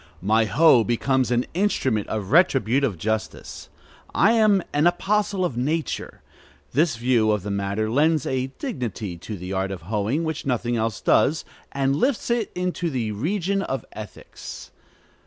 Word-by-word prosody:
My 110 +3 +2
hoe 130 0 +5
becomes 130 +3 +1
an 120 0 +1
instrument 135 - 0
of 105 -2 -4
retributive 135 - +3
justice. 110 +5 -4 0.5
I 200 - +5
am 215 -5 +4
an 150 +3 +3
apostle 195 +1 +1
of 135 -9 -3
nature. 155 +6 -3 0.5
This 155 0 +2
view 115 -2 +2
of 105 -3 +1
the 105 - -4
matter 100 +2 -1
lends 150 +5 +2
a 130 0 -1
dignity 115 - -4
to 105 +4 -7
the 90 +2 -6
art 95 0 -1
of 95 -5 -7
hoeing 110 - -1
which 160 -1 -3
nothing 120 -2 -1
else 110 -2 -2
does, 155 - +2 0.3
and 135 0 0
lifts 245 - 0
it 235 -3 0
into 180 -1 -2
the 120 -7 -2
region 190 - -1
of 135 -8 -3
ethics. 105 -3 -10
130 Hz, 155 wpm, -23 LUFS, 110-170 Hz, 0.5 s, hoe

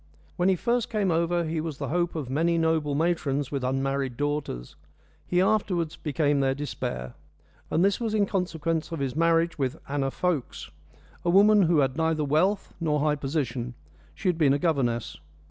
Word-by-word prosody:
When 180 +2 +2
he 190 - +4
first 235 +5 0
came 210 -5 0
over 170 +1 +1
he 160 0 -2
was 155 -3 -5
the 140 -3 -4
hope 175 +2 0
of 150 -5 -3
many 165 +6 +1
noble 160 -3 +1
matrons 145 -4 0
with 140 -3 -2
unmarried 135 -1 -1
daughters. 145 - -3 0.5
He 180 - +1
afterwards 185 -5 +1
became 145 -1 0
their 135 -1 +1
despair; 65 - -4 0.6
and 170 +4 +2
this 200 0 +2
was 225 -2 -1
in 205 -2 +3
consequence 165 -4 -2
of 165 - -3
his 135 -2 -2
marriage 165 0 +2
with 135 +2 -1
Anna 140 -1 -1
Fokes 160 -2 -2 0.5
a 175 - 0
woman 205 +3 +6
who 165 -4 +4
had 135 +1 0
neither 160 -2 +1
wealth 185 +8 +1
nor 150 -3 +1
high 150 0 +2
position 135 -4 -3 0.4
she - - -4
had 175 -2 +1
been 140 -4 +4
a - - +2
governess. 120 - 0
155 Hz, 180 wpm, -26 LUFS, 140-175 Hz, 0.6 s, woman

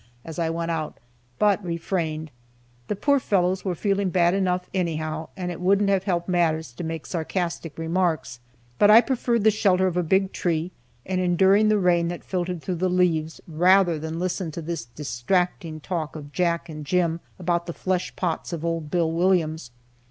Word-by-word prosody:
as 165 +1 -7
I 165 -1 +1
went 165 +1 -2
out, 160 -2 -3 0.4
but 205 -1 +2
refrained. 165 -3 -3 0.6
The 210 - -1
poor 280 +7 +2
fellows 185 -5 +1
were 185 -3 -1
feeling 200 0 0
bad 175 -1 +3
enough, 180 -2 0
anyhow, 160 -3 -2
and 180 -1 -3
it 175 - -7
wouldn't 200 +2 +3
have 190 -1 +1
helped 175 -3 -1
matters 160 -5 +1
to 145 - -7
make 160 -1 -4
sarcastic 170 -1 -3
remarks. 165 -7 -1 0.4
But 205 - +6
I 215 +2 +10
preferred 240 -3 0
the 220 - +6
shelter 190 -3 +2
of 180 -2 0
a - - +3
big 190 +3 +1
tree, 170 0 -1 0.3
and 185 -1 -1
enduring 190 +4 +4
the 215 - +4
rain 175 -3 +2
that 175 0 -5
filtered 180 -2 -3
through 180 -2 -2
the 185 - +2
leaves, 165 -3 +1
rather 175 +1 +4
than 160 +1 -5
listen 180 -1 -2
to 170 - -5
this 165 -6 -4
distracting 155 - -2
talk 160 -3 -4
of 145 -2 -8
Jack 170 0 0
and 155 -2 -7
Jim 170 +2 +1 0.2
about 175 -1 -1
the - - -2
flesh 185 +1 -2
pots 175 -1 -2
of 170 -1 -4
old 165 -2 -2
Bill 165 0 +1
Williams. 165 -5 +1
175 Hz, 180 wpm, -24 LUFS, 160-185 Hz, 0.6 s, I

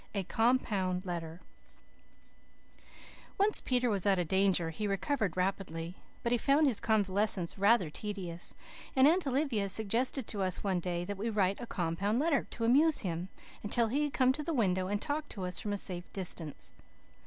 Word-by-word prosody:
A 200 - 0
COMPOUND 200 -5 +1
LETTER 170 -1 -5 2.0
Once 410 +2 +2
Peter 250 -1 +1
was 205 -3 +1
out 195 -1 +4
of 175 -2 -1
danger 190 -3 +2
he 210 +6 -3
recovered 200 - -1
rapidly, 180 -2 -2 0.3
but 235 - 0
he 245 - +3
found 280 +6 +3
his 255 -7 +1
convalescence 205 -4 +1
rather 200 -4 +3
tedious; 185 -3 -5 0.4
and 265 +1 +6
Aunt 340 0 +3
Olivia 255 -7 0
suggested 230 +6 +1
to 205 - -2
us 185 -1 -1
one 190 -3 +1
day 175 0 -2
that 200 +1 -5
we 225 +3 -1
write 200 -3 +1
a 240 - -6
"compound 185 +5 -1
letter" 290 +1 +1
to 230 - -3
amuse 295 +7 +5
him, 175 -1 -3 0.3
until 225 +2 +1
he 290 +5 +1
could 290 - -4
come 260 -1 +4
to 300 - -3
the 330 0 -2
window 185 -6 +1
and 205 +1 -1
talk 295 +4 -3
to 190 -3 -4
us 180 - -2
from 210 - -4
a 205 - -1
safe 180 -3 -5
distance. 170 -5 -5
200 Hz, 175 wpm, -32 LUFS, 185-245 Hz, 2.0 s, and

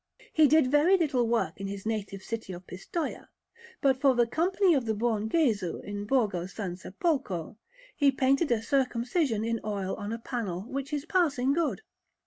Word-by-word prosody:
He 310 -1 +6
did 290 -3 +4
little 295 -6 +3
work 225 -7 -1
in 195 - -3
his 200 0 -6
native 205 -3 -3
city 225 -4 -5
of 180 +1 -9
Pistoia; 295 - -5 0.5
but 270 -1 +2
for 270 -3 +5
the 240 0 +4
Company 355 - +2
of 260 -6 0
the 220 - 0
Buon 220 -1 0
Gesù 220 - +1
in 205 0 -5
Borgo 205 -8 +1
San 190 -2 -5
Sepolcro 195 - -2 0.4
he 285 -2 +4
painted 270 +2 +2
a 225 -2 +1
Circumcision 250 - 0
in 230 0 -1
oil 200 -3 -2
on 205 0 -5
a 230 - -2
panel, 225 -7 -4
which 275 +4 -5
is 295 0 -2
passing 300 -8 +2
good. 330 +3 0
240 Hz, 170 wpm, -28 LUFS, 205-285 Hz, 0.5 s, He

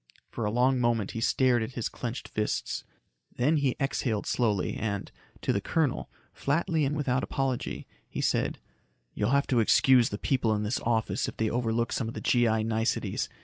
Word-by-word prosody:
For 115 - -3
a 105 - 0
long 125 +3 +3
moment 120 -4 +1
he 115 - -4
stared 125 0 +3
at 110 +3 -4
his 120 -3 -2
clenched 120 +1 -5
fists. 105 0 -2 0.5
Then 145 +6 +2
he 140 -4 +1
exhaled 125 -6 -1
slowly 105 -6 0
and, 100 -3 -3 0.3
to - - +1
the 100 - 0
colonel, 155 +3 0 0.2
flatly 160 +1 0
and 140 +2 -1
without 135 -3 +1
apology, 135 -2 -2 0.2
he - - -5
said, - - +1 0.6
"You'll 105 - 0
have 140 +2 +3
to 125 - +2
excuse 125 +2 +5
the 105 - -4
people 115 -3 +1
in 105 - -1
this 105 +4 -1
office 115 -1 0
if - - -7
they 110 -1 0
overlook 115 -1 0
some 115 - -1
of 115 - -6
the - - -3
G.I. 115 -3 +2
niceties. 110 0 -1
120 Hz, 185 wpm, -28 LUFS, 110-130 Hz, 0.6 s, excuse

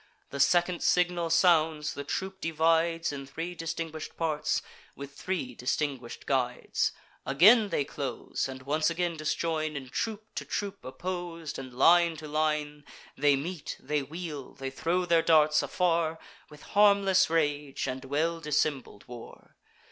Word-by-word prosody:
The 140 - -5
second 175 +4 +3
signal 175 -1 +2
sounds, 160 -3 +3
the 140 - -5
troop 190 +6 -4
divides 165 +1 +1
In 135 -1 -7
three 165 +5 -5
distinguish'd 165 -1 -5
parts, 155 -2 0 0.3
with 140 0 -9
three 155 -6 -3
distinguish'd 125 0 -3
guides 125 -3 0 0.3
Again 205 - +6
they 145 -5 0
close, 135 -2 -4
and 130 -1 -8
once 155 +4 +1
again 170 0 -1
disjoin; 155 0 -2
In 135 -2 -6
troop 215 - -4
to - - -4
troop 200 -1 -4
oppos'd, 170 +1 -5
and 130 -1 -8
line 165 +6 +4
to 155 0 -8
line. 150 -1 -1 0.3
They 145 0 +4
meet; 160 +3 -5
they 150 -1 -1
wheel; 150 -1 -7
they 135 0 -5
throw 170 +6 0
their 170 -1 +4
darts 155 -2 +4
afar 165 +2 0 0.3
With 150 -1 -14
harmless 200 -3 +5
rage 145 -3 0
and 130 0 -4
well 155 +5 -1
dissembled 145 -7 -2
war. 120 -2 -12
155 Hz, 140 wpm, -29 LUFS, 140-170 Hz, 0.3 s, Again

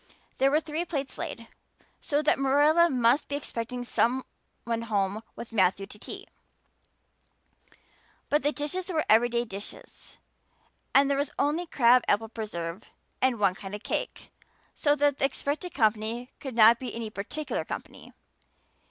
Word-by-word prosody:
There 270 - +5
were 300 +2 +3
three 315 +1 -3
plates 280 -6 -4
laid, 230 0 -5 0.5
so 290 +1 0
that 300 - +3
Marilla 295 +5 +4
must 255 +1 +3
be 285 - -3
expecting 245 -3 -4
some 245 +2 +1 0.4
one 230 -1 -2
home 205 -2 -1
with 235 - -9
Matthew 195 -1 +2
to 210 +1 -13
tea; - - -8 2.0
but 295 - +2
the 290 +3 +1
dishes 325 +6 -3
were 320 -4 0
everyday 235 +2 +3
dishes 200 -2 -10 0.8
and 275 +1 +6
there 280 0 +1
was 285 0 0
only 315 +5 0
crab 250 -5 +5
apple 220 +2 +1
preserves 195 -5 -5 0.3
and 260 -2 +3
one 200 -3 +3
kind 195 +1 -7
of 210 - -9
cake, - - -4 0.4
so 290 -1 +2
that 290 -1 +2
the - - +3
expected 295 +5 -3
company 225 +1 0
could 265 -4 -6
not 230 +1 +7
be 255 -3 -6
any 225 -2 -5
particular 215 +10 -4
company. - - -8
245 Hz, 150 wpm, -28 LUFS, 220-290 Hz, 2.0 s, not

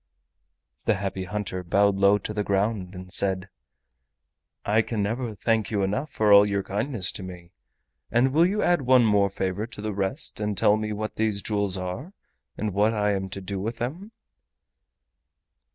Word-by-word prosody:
The - - +3
Happy 95 0 -3
Hunter 95 -2 -4
bowed 100 +3 +3
low 100 +1 +4
to 105 +1 -5
the 105 -1 -1
ground 100 -1 -1
and 90 0 -9
said: 95 -1 0 1.2
"I 110 +2 +3
can 110 -2 -2
never 115 +2 -2
thank 110 +2 0
you 100 -3 0
enough 130 +11 -1
for 105 -1 +3
all 100 0 +9
your 100 -1 0
kindness 105 -1 -1
to - - -5
me. 90 -2 -9 0.6
And 120 +2 +4
now 135 - +1
will 165 +5 +4
you 205 +3 0
add 175 -3 +3
one 130 -2 +5
more 100 -2 +3
favor 95 +2 -3
to 120 - -9
the 105 0 -3
rest 100 +9 -2
and 105 -2 -2
tell 105 +1 +4
me 110 0 -3
what 110 +1 -4
these 110 -3 0
jewels 100 -3 0
are 95 - -5 0.4
and 105 -2 -2
what 105 +3 +2
I 105 -1 +1
am 95 -1 -2
to 100 +1 -5
do 95 +1 -4
with 110 +5 -3
them?" 170 - -5
105 Hz, 185 wpm, -25 LUFS, 95-110 Hz, 1.2 s, all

